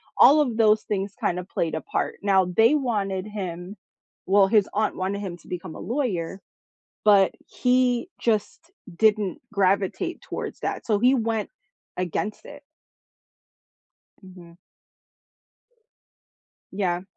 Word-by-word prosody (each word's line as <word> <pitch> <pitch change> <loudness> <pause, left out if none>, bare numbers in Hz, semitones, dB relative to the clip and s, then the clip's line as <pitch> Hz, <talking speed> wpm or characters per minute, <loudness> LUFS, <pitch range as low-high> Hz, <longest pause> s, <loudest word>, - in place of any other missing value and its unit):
all 300 +2 +7
of 250 -6 -1
those 215 -1 +4
things 200 -1 -3
kind 180 0 0
of 180 - -9
played 165 -2 -2
a 160 - -3
part. - - -2
Now, 195 -2 +3
they 225 +10 +4
wanted 205 -9 -1
him 185 -3 -6 0.5
well, 195 +1 +5
his 210 -1 +3
aunt 215 +1 0
wanted 190 +2 -2
him 180 -3 -5
to - - -21
become 180 -2 -6
a - - -9
lawyer, 195 - -2 0.7
but 200 -2 +6 0.2
he 250 +4 +1
just 215 -3 0 0.4
didn't 210 -3 +2
gravitate 200 - 0
towards - - -6
that. - - -4
So, 210 -3 +1
he 255 +4 +4
went 225 -3 -1 0.5
against 185 +4 -3
it. 290 0 -11 1.6
Mhm. 180 -3 -14 2.2
Yeah. 180 -3 -1
200 Hz, 125 wpm, -24 LUFS, 185-225 Hz, 2.2 s, all